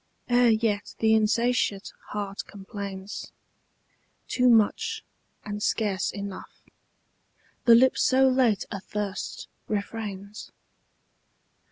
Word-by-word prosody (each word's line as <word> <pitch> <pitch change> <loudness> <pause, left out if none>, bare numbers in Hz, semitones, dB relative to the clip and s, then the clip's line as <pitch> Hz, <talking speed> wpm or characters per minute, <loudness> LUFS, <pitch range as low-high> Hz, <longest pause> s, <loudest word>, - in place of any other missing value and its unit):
Ere 245 0 +5
yet 220 -2 0
the 220 0 +3
insatiate 220 -1 +1 0.2
heart 200 -1 -4
complains 200 0 -7 1.0
'Too 250 -1 +3
much, 225 -3 +2 0.4
and 205 0 -5
scarce 205 -3 0
enough,' 200 -1 -8 1.0
The 235 - +8
lip 255 +3 +5
so 265 0 +4
late 255 -5 +2
athirst 200 0 -5 0.2
refrains. 205 -1 -5
210 Hz, 85 wpm, -26 LUFS, 200-235 Hz, 1.0 s, The